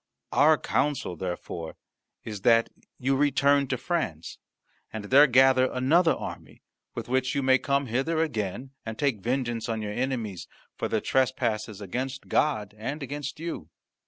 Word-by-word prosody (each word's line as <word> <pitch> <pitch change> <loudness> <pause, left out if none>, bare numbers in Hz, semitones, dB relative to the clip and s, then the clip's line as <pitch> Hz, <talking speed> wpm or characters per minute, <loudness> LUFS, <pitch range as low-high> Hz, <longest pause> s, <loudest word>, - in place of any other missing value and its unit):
Our 155 +2 +5
counsel, 145 -14 -1
therefore, 85 -1 -5 0.5
is 105 -3 -6
that 115 +1 +4 0.3
you 135 +2 +1
return 140 0 +3
to 130 - -1
France, 120 - -3 0.5
and 110 -2 -6
there 140 +7 +7
gather 130 0 +5
another 160 +7 +3
army, - - -8 0.3
with - - -5
which 130 +1 0
you 140 - 0
may 130 0 +4
come 140 0 0
hither 135 +7 -1
again 120 - -4
and 110 -1 -6
take 140 -7 0
vengeance 120 -1 -2
on 110 -1 -2
your 105 0 -4
enemies 120 -7 -3 0.3
for - - -2
their - - 0
trespasses 115 -5 0
against 130 +7 -4
God 105 -10 +1
and 140 +7 -4
against 145 +2 -5
you." 160 - -5
130 Hz, 150 wpm, -27 LUFS, 110-140 Hz, 0.5 s, there